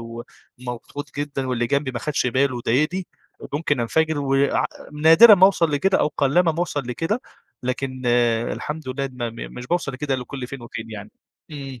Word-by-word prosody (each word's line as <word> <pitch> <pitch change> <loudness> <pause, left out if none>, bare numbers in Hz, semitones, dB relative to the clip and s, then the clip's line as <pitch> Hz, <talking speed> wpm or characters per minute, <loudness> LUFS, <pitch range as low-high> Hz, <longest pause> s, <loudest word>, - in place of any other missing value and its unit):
ومضغوط 120 +4 -9
جدًا 140 -2 -3
واللي 120 -1 0
جنبي 140 +2 0
ما 125 - -4
خدش 140 0 -1
باله 130 +1 +1
وضايقني، 150 +10 0 0.5
ممكن 145 -3 0
انفجر 160 +6 +1
و 135 -1 0
ع 140 +1 +2 0.3
نادرًا 165 +9 +8
ما 190 -1 +7
أوصل 175 -5 +2
لكده، 185 +7 +2
أو - - +2
قلّما 160 +5 +3
ما 160 - -8
أوصل 170 -4 -1
لكده، 165 - -1 0.4
لكن 130 +1 -3 0.5
الحمد 150 -2 -6
لله، 135 +1 -2
م 125 -2 -9 0.2
م - - -8
مش 125 0 -7
باوصل 175 -4 -1
لكده 135 +1 -2
إلّا 125 -1 -3
كل 130 -2 -6
فين 130 0 -8
وفين 115 -1 -7
يعني. 105 -1 -8 0.4
إمم. 135 -4 -8
140 Hz, 180 wpm, -22 LUFS, 125-155 Hz, 0.5 s, نادرًا